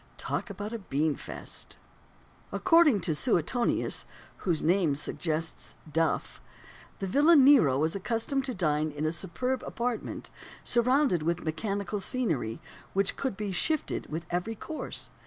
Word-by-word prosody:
Talk -, -, -3 dB
about 210 Hz, +2 st, -5 dB
a 230 Hz, -, -3 dB
bean 150 Hz, -5 st, 0 dB
feast! -, -, -8 dB, 0.7 s
According 330 Hz, -, +5 dB
to 165 Hz, -2 st, 0 dB
Suetonius 225 Hz, -, +1 dB, 0.3 s
(whose 170 Hz, -5 st, -1 dB
name 170 Hz, -4 st, +3 dB
suggests 160 Hz, +2 st, -3 dB, 0.2 s
"duff") 165 Hz, 0 st, 0 dB, 0.6 s
the 195 Hz, -, -3 dB
villain 290 Hz, -, +6 dB
Nero 245 Hz, -, +6 dB
was 160 Hz, +4 st, +1 dB
accustomed 230 Hz, +7 st, -1 dB
to 255 Hz, -3 st, -4 dB
dine 155 Hz, -4 st, +1 dB
in 150 Hz, +1 st, -4 dB
a 155 Hz, -, +1 dB
superb 195 Hz, +10 st, -2 dB
apartment, 240 Hz, -1 st, -4 dB, 0.3 s
surrounded 250 Hz, -, +3 dB
with 170 Hz, +2 st, -1 dB
mechanical 200 Hz, +5 st, -2 dB
scenery, 165 Hz, -, -1 dB, 0.3 s
which 195 Hz, 0 st, +1 dB
could 260 Hz, -8 st, -3 dB
be 210 Hz, -2 st, -3 dB
"shifted" 310 Hz, -, -1 dB
with 160 Hz, +2 st, -4 dB
every 180 Hz, +6 st, -1 dB
course. 315 Hz, +8 st, -5 dB
195 Hz, 135 wpm, -29 LUFS, 160-245 Hz, 0.7 s, villain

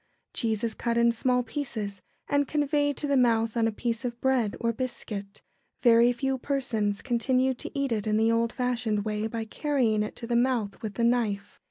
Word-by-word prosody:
Cheese 220 Hz, -2 st, 0 dB
is 230 Hz, -1 st, 0 dB
cut 235 Hz, -1 st, -1 dB
in 235 Hz, 0 st, +5 dB
small 250 Hz, +2 st, +1 dB
pieces 220 Hz, -6 st, -4 dB, 0.3 s
and 285 Hz, -1 st, +2 dB
conveyed 290 Hz, -1 st, +1 dB
to -, -, -1 dB
the 280 Hz, -1 st, +1 dB
mouth 230 Hz, -3 st, +3 dB
on 230 Hz, -1 st, +2 dB
a -, -, 0 dB
piece 230 Hz, +2 st, -2 dB
of 240 Hz, -1 st, -4 dB
bread 250 Hz, -6 st, +1 dB
or 230 Hz, 0 st, 0 dB
biscuit. 215 Hz, -5 st, -5 dB, 0.4 s
Very 235 Hz, 0 st, +6 dB
few 265 Hz, +2 st, -1 dB
persons 230 Hz, -8 st, -1 dB
continue 255 Hz, +1 st, +1 dB
to 295 Hz, +6 st, -7 dB
eat 275 Hz, -2 st, 0 dB
it 215 Hz, -2 st, -1 dB
in 215 Hz, 0 st, +2 dB
the 225 Hz, +1 st, +3 dB
old 230 Hz, 0 st, +1 dB
fashioned 235 Hz, -5 st, -1 dB
way 215 Hz, 0 st, -1 dB
by 225 Hz, 0 st, -4 dB
carrying 240 Hz, -4 st, +1 dB
it 210 Hz, -, -3 dB
to 235 Hz, -, -7 dB
the 235 Hz, 0 st, -1 dB
mouth 235 Hz, -4 st, +1 dB
with 215 Hz, -2 st, -5 dB
the 235 Hz, -, 0 dB
knife. 215 Hz, -4 st, 0 dB
235 Hz, 200 wpm, -27 LUFS, 220-255 Hz, 0.4 s, Very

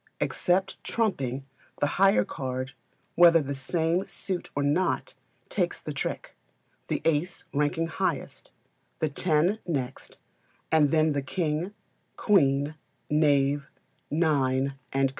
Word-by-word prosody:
Except 190 Hz, +1 st, 0 dB
trumping, 135 Hz, -, -1 dB, 0.3 s
the -, -, +3 dB, 0.2 s
higher 195 Hz, -, +5 dB
card, 130 Hz, 0 st, -4 dB, 0.4 s
whether 170 Hz, -1 st, +7 dB
of 155 Hz, -, 0 dB
the 140 Hz, -, -2 dB
same 165 Hz, +7 st, 0 dB
suit 185 Hz, -2 st, -4 dB
or 145 Hz, -, 0 dB
not, 165 Hz, +5 st, +1 dB, 0.3 s
takes -, -, -1 dB
the -, -, -6 dB
trick -, -, -4 dB, 0.5 s
the -, -, -2 dB
ace 165 Hz, +3 st, 0 dB
ranking 150 Hz, +3 st, +1 dB
highest, 165 Hz, -, -3 dB, 0.5 s
the 155 Hz, -, 0 dB
ten 170 Hz, +7 st, +1 dB
next, 135 Hz, -6 st, -4 dB, 0.5 s
and 155 Hz, -2 st, +5 dB
then 155 Hz, +1 st, +3 dB
the 140 Hz, -1 st, 0 dB
king, 155 Hz, +7 st, -2 dB, 0.4 s
queen, 145 Hz, -7 st, +3 dB, 0.4 s
knave, 145 Hz, -2 st, +2 dB, 0.4 s
nine, 140 Hz, -4 st, +1 dB, 0.2 s
&c. 135 Hz, 0 st, +2 dB
150 Hz, 120 wpm, -27 LUFS, 140-175 Hz, 0.5 s, whether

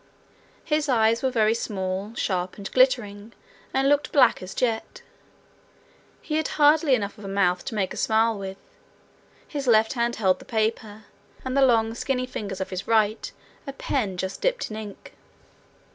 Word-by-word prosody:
His 300 Hz, -1 st, 0 dB
eyes 230 Hz, -2 st, +3 dB
were 265 Hz, -, +1 dB
very 220 Hz, -3 st, +2 dB
small, 195 Hz, -1 st, -4 dB
sharp, 185 Hz, -4 st, -2 dB
and 200 Hz, -1 st, -7 dB
glittering, 230 Hz, -4 st, +1 dB, 0.4 s
and 270 Hz, +1 st, +1 dB
looked 290 Hz, +1 st, +2 dB
black 270 Hz, -4 st, +4 dB
as 185 Hz, 0 st, -8 dB
jet. 230 Hz, -3 st, -2 dB, 1.2 s
He 305 Hz, -1 st, -2 dB
had 315 Hz, -, 0 dB
hardly 295 Hz, -1 st, +5 dB
enough 205 Hz, -2 st, -4 dB
of 205 Hz, -, -10 dB
a -, -, -5 dB
mouth 185 Hz, -2 st, +1 dB
to 230 Hz, -, -5 dB
make 195 Hz, -3 st, -1 dB
a -, -, -9 dB
smile 225 Hz, 0 st, +2 dB
with. 195 Hz, -1 st, -6 dB, 0.9 s
His 285 Hz, -3 st, -5 dB
left 220 Hz, -2 st, +4 dB
hand 235 Hz, -1 st, 0 dB
held 190 Hz, -4 st, +1 dB
the -, -, -14 dB
paper, 220 Hz, -1 st, -2 dB, 0.4 s
and 260 Hz, 0 st, -2 dB
the 275 Hz, -, +3 dB
long, 225 Hz, -4 st, +3 dB
skinny 255 Hz, +1 st, -2 dB
fingers 200 Hz, -6 st, -6 dB
of 190 Hz, -, -4 dB
his 185 Hz, 0 st, -5 dB
right 220 Hz, -1 st, +1 dB, 0.4 s
a 275 Hz, -, -5 dB
pen 215 Hz, -8 st, -2 dB
just 190 Hz, +1 st, -4 dB
dipped -, -, -1 dB
in 215 Hz, -, -5 dB
ink. 210 Hz, -2 st, -9 dB
225 Hz, 170 wpm, -25 LUFS, 200-255 Hz, 1.2 s, hardly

